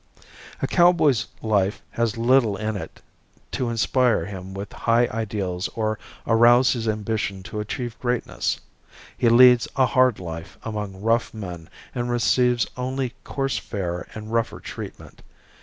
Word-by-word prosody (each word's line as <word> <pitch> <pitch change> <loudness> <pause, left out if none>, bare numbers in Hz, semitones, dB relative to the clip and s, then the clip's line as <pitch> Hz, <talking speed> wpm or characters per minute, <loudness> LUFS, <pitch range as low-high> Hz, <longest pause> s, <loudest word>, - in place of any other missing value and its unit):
A - - +4
cowboy's 165 -8 +4 0.2
life 105 -2 +1
has 115 -1 -1
little 115 -3 +3
in 110 +1 -2
it 100 - -8 0.5
to 125 -2 -1
inspire 115 -3 +2
him 95 -1 -7
with 100 +1 -6
high 115 +1 +2
ideals 100 -5 -2
or 110 -1 -1 0.3
arouse 120 +2 +5
his 115 -3 -3
ambition 105 -3 -2
to 105 - -6
achieve 115 +2 -4
greatness. 125 -1 -1 0.6
He 120 - +3
leads 125 0 +7
a 130 - +4
hard 130 -2 +3
life 80 -2 -7
among 105 -3 -5
rough 115 +2 +1
men 90 -6 -7 0.2
and 120 -1 -2
receives 120 0 +2
only 130 0 -2
coarse 135 -1 -2
fare 90 -4 -4
and 110 +1 -7
rougher 115 -1 0
treatment. - - -9
115 Hz, 140 wpm, -24 LUFS, 105-125 Hz, 0.6 s, leads